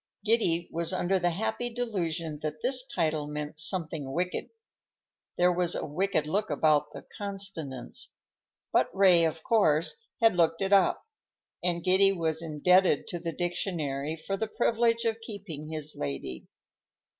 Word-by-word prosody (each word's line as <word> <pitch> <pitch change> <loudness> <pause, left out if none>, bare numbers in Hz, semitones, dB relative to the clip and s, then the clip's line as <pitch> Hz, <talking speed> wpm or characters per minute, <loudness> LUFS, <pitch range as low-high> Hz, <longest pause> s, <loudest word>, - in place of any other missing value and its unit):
Giddy 175 -7 +2
was 170 +2 +1
under 185 +1 +1
the 175 0 +2
happy 220 +7 -2
delusion 170 -10 -3
that 155 0 -5
this 255 -1 +2
title 155 -4 -1
meant 150 +1 -5
something 160 -5 0
wicked,—there 180 - -4
was 175 -1 +1
a - - -2
wicked 170 +1 0
look 200 +7 -1
about 150 -1 +2
the - - -10
consonants,—but 195 -10 -4
Ray, 185 -4 +6
of 160 0 -3
course, 160 -5 +2 0.2
had 225 -5 +4
looked 165 +1 +2
it 195 +1 +1
up, 195 -2 +4 0.6
and 170 -1 0
Giddy 190 +1 +5
was 160 -3 -1
indebted 170 +1 +3
to 175 - -3
the 165 0 -3
dictionary 160 -4 -2
for 180 +5 -4
the 220 +3 -2
privilege 230 0 +1
of 225 0 -1
keeping 195 -9 -7
his 155 -1 -3
lady. 70 -2 -5
175 Hz, 140 wpm, -28 LUFS, 155-195 Hz, 0.6 s, Ray